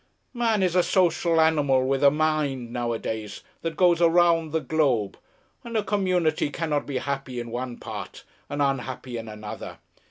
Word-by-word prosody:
Man 230 -5 +1
is 180 -1 +1
a 180 - +6
social 175 -2 +2
animal 145 -5 +3
with 135 +1 0
a 140 - +8
mind 145 -5 -1
nowadays 110 -3 -3 0.2
that 165 -1 -4
goes 175 -2 +4
around 170 -1 +4
the 160 - +1
globe, 130 -8 0 0.5
and 235 -1 -3
a 215 - +1
community 185 -7 +1
cannot 150 -1 -2
be 140 -3 -2
happy 135 -2 -3
in 120 -1 -6
one 120 0 -4
part 100 -4 -8 0.3
and 145 0 0
unhappy 130 -2 -2
in 115 0 -7
another. 105 -1 -8
145 Hz, 160 wpm, -25 LUFS, 125-170 Hz, 0.5 s, a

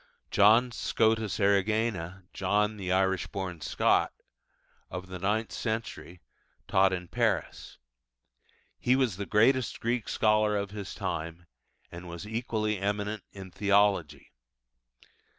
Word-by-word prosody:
John 115 +5 +5
Scotus 110 -2 0
Erigena 100 -2 +1
('John 105 +3 0
the 95 -2 -3
Irish 95 -1 +1
born 95 -4 -5
Scot') - - +2 0.8
of 90 +1 -6
the 95 -1 -6
ninth 105 +4 -1
century 110 -6 -4 0.5
taught 95 0 +4
in 90 -1 -4
Paris; - - -2 1.0
he 125 - +3
was 125 -8 +1
the 100 - -5
greatest 120 +3 +2
Greek 120 -1 -1
scholar 105 -1 +2
of 100 -1 -3
his 100 -2 -7
time, 80 +2 -4 0.5
and 85 +1 -9
was 85 +4 -7
equally 110 -2 -2
eminent 105 +1 -2
in 95 -2 -10
Theology. 100 -8 +1
100 Hz, 115 wpm, -29 LUFS, 95-110 Hz, 1.0 s, John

